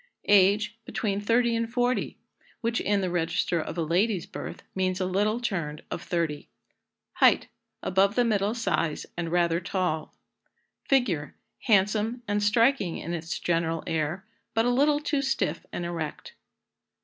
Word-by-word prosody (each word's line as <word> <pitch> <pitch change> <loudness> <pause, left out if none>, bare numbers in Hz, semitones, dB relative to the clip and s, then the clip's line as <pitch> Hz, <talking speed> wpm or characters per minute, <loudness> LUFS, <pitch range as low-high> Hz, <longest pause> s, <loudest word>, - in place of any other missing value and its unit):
Age. 205 +3 +4
Between 205 -4 -2
30 235 +2 +2
and 230 0 -1
40, 245 +1 0 0.4
which, 230 0 0
in 205 -1 +1
the 185 -2 -1
register 170 0 0
of 165 - -6
a 165 - +1
lady's 180 +4 +1
birth, - - -8
means 185 0 0
a 185 - 0
little 205 +5 +1
turned 170 -11 -3
of - - -3
30. 165 -5 -2 0.7
Height. - - +5 0.4
Above 195 +2 +2
the 245 - +3
middle 210 -1 +1
size, 170 -9 -1
and 170 -2 -3
rather 170 -1 +2
tall. 175 -3 -2 0.7
Figure. 205 - +1 0.3
Handsome, 215 +3 +2
and 205 0 0
striking 230 -2 +2
in 170 - -5
its 165 0 -3
general 165 -1 0
air, 160 +4 -2 0.3
but 225 +1 +3
a 245 - +3
little 290 +4 +3
too 295 -2 0
stiff 270 0 -1
and 175 - -4
erect. 165 -3 -5
195 Hz, 150 wpm, -27 LUFS, 170-230 Hz, 0.7 s, Height